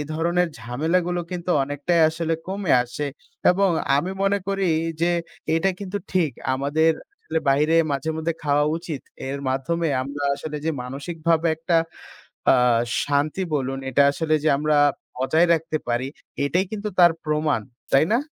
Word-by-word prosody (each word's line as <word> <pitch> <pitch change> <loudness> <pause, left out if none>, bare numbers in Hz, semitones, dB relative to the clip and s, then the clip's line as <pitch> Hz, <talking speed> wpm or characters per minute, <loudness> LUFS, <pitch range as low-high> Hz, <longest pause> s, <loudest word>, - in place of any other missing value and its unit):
ধরনের 170 +2 +1
ঝামেলাগুলো 165 +10 -1
কিন্তু 180 0 -4
অনেকটাই 145 +5 0
আসলে 165 0 -1
কমে 195 -3 -1
আসে। 125 +4 -4 0.4
এবং 195 +1 +3 0.3
আমি 175 +6 -1
মনে 200 +1 +2
করি 195 -1 0 0.3
যে 170 - +3 0.5
এটা 180 +4 +2
কিন্তু 200 +1 -3
ঠিক। 170 -6 +2 0.2
আমাদের 150 +4 +2 0.3
আসলে 160 - -1
বাইরে 150 +4 +3 0.2
মাঝে 140 +3 -1
মধ্যে 160 +1 -1
খাওয়া 145 0 +2
উচিত। 165 -4 -5 0.3
এর 140 - -3
মাধ্যমে 165 +6 -1
আমরা 140 +2 -5
আসলে 150 +1 -6
যে 160 - +1
মানসিকভাবে 160 +5 -1
একটা 165 +1 +1 0.8
আ - - +6 0.5
শান্তি 145 +6 0
বলুন 135 -1 -1
এটা 140 +3 +4
আসলে 155 0 0
যে 155 - +4
আমরা 150 0 +2 0.4
বজায় 160 +7 +3
রাখতে 160 -1 -2
পারি 120 +2 0 0.4
এটাই 180 +6 +1
কিন্তু 210 0 -3
তার 175 -2 +7
প্রমাণ। 150 -4 +1 0.3
তাই 135 +3 +6
না? 235 - +4
160 Hz, 145 wpm, -23 LUFS, 145-175 Hz, 0.8 s, তার